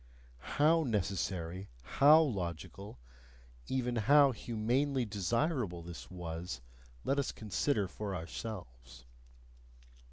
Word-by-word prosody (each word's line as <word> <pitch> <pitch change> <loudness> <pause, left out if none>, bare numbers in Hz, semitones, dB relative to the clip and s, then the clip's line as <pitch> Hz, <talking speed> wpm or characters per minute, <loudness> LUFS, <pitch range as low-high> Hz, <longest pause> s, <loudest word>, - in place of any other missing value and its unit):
HOW 160 +3 +5
necessary, 95 - -2
HOW 150 - +6
logical, 95 - -4 0.7
even 125 -2 -1
HOW 140 +5 +6
humanely 125 +4 0
desirable 105 - -1
this 85 0 -9
was, 85 -5 -5 0.4
let 140 +1 +1
us 140 - 0
consider 110 0 0
for 100 +1 -5
ourselves! 60 - -7
105 Hz, 90 wpm, -33 LUFS, 85-130 Hz, 0.7 s, HOW